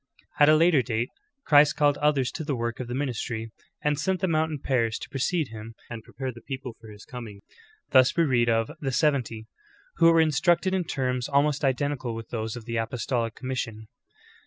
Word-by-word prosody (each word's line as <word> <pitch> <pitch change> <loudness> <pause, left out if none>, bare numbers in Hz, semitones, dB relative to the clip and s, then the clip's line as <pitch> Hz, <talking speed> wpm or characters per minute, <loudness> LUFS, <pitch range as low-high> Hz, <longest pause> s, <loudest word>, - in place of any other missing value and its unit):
14. 145 0 +7
At - - +6
a - - +4
later 165 -3 +4
date 115 +1 -2 0.4
Christ 145 -1 +6
called 145 -2 +2
others 145 -4 +2
to - - -5
the 145 -2 -2
work 115 -1 -3
of 125 - -4
the 120 - -4
ministry, 120 -4 -3 0.3
and 150 -1 +1
sent 185 +5 0
them 185 -3 0
out 160 +1 +2
in 155 - -4
pairs 120 -5 0
to - - -9
precede 145 +2 -1
Him 110 0 -9 0.2
and 115 -1 -6
prepare 130 +2 -5
the 120 -1 -13
peo])le 135 -3 -6
for 115 - -13
His 105 -1 -13
cominj^. 110 -5 -9 0.5
Thus 130 +1 +5
we 170 - +5
real 120 -5 +2
of 115 -1 +1
"the 135 -2 -2
seventy" 125 -5 0 0.5
who 165 - +6
were 165 - +4
instructed 170 +4 +2
in 185 -2 0
terms 125 -4 -2
almost 145 +1 +2
identical 135 -3 -1
with 115 0 -8
those 110 -1 -3
of 120 -2 -9
the 115 -1 -3
apostolic 115 0 -2
commission. 115 -5 -5
130 Hz, 205 wpm, -26 LUFS, 115-150 Hz, 0.5 s, 14